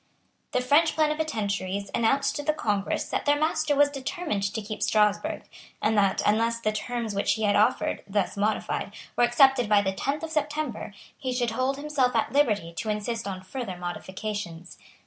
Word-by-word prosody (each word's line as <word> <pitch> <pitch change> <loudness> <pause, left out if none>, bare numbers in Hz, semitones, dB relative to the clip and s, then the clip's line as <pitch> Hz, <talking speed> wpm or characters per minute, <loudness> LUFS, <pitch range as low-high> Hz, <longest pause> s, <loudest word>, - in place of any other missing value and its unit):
The 250 - +1
French 295 +6 +3
plenipotentiaries 210 -11 -1
announced 275 +5 +2
to - - -2
the 305 +1 +1
Congress 205 -9 -1
that - - -2
their 290 0 +4
master 310 -1 +1
was 290 0 +4
determined 285 - -3
to 220 - -3
keep 215 0 -6
Strasburg, 210 -1 +1 0.4
and 220 - +1
that, 200 -2 +2
unless 230 +2 +2
the 215 -2 0
terms 230 0 -3
which 200 - +1
he 220 - -3
had 205 -1 +3
offered, 210 +1 +2
thus 200 -1 -1
modified, 210 +2 -1 0.2
were - - +3
accepted 245 -1 +4
by 205 -1 +5
the 190 -1 0
tenth 280 +10 -2
of 325 - -4
September, 300 -7 -2 0.2
he 260 -3 -4
should 245 -2 0
hold 255 +4 0
himself 285 -4 0
at 225 - +1
liberty 210 -12 +2
to 220 - -3
insist 210 +1 -2
on 190 -1 -5
further 195 -2 -5
modifications. 180 0 -6
230 Hz, 175 wpm, -26 LUFS, 205-280 Hz, 0.4 s, by